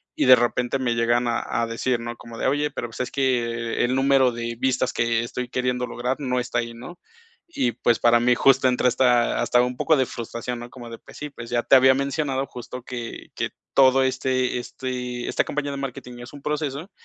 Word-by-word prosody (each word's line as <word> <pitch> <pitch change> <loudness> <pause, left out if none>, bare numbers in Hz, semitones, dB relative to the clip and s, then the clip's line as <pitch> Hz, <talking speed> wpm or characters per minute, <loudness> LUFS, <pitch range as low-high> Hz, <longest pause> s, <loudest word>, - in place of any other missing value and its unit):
y - - +1
de 130 - +9
repente 120 +2 0
me 125 -2 0
llegan 120 +1 +2
a 120 - 0 0.2
a - - +1
decir, 120 +2 -1
¿no?, 120 0 -6
como 115 0 -11
de: - - -1
"Oye, 145 +2 +1
pero, 120 - -4
pues, 110 - -11
es 125 - -2
que 120 -4 0
el 125 +1 0
número 135 -1 +4
de 120 0 -4
vistas 130 -1 0
que 115 0 +1
estoy 125 +1 -4
queriendo 125 0 -1
lograr 125 +2 -2
no 125 -3 -1
está 120 -1 -1
ahí", 115 0 -4
¿no? 150 +10 -11 0.5
Y, 130 - -1
pues, 120 +1 +1
para 120 0 +5
mí 120 +1 +3
justo 135 +1 +4
entra 125 0 +2
esta, 125 -1 +2
hasta 120 - +3
un 125 0 -2
poco 155 - +3
de 130 - +2
frustración, 120 +1 -5
¿no? 120 0 -8
Como 120 -2 -10
de: 115 - -8
"Pues, - - -15
sí, 150 - -6
pues, 120 -4 -10
ya 120 0 0
te - - +5
había 130 0 +7
mencionado 140 0 -1
justo 125 0 -8
que 120 -2 -7
que - - -2 0.3
todo 135 0 +5
este 130 -1 0
este 125 -1 -5
esta - - +1
campaña 145 -1 -3
de 140 - -5
marketing 125 -2 -7
es 120 +2 -10
un 145 - -11
proceso, 150 +4 -3
125 Hz, 220 wpm, -23 LUFS, 120-130 Hz, 0.5 s, de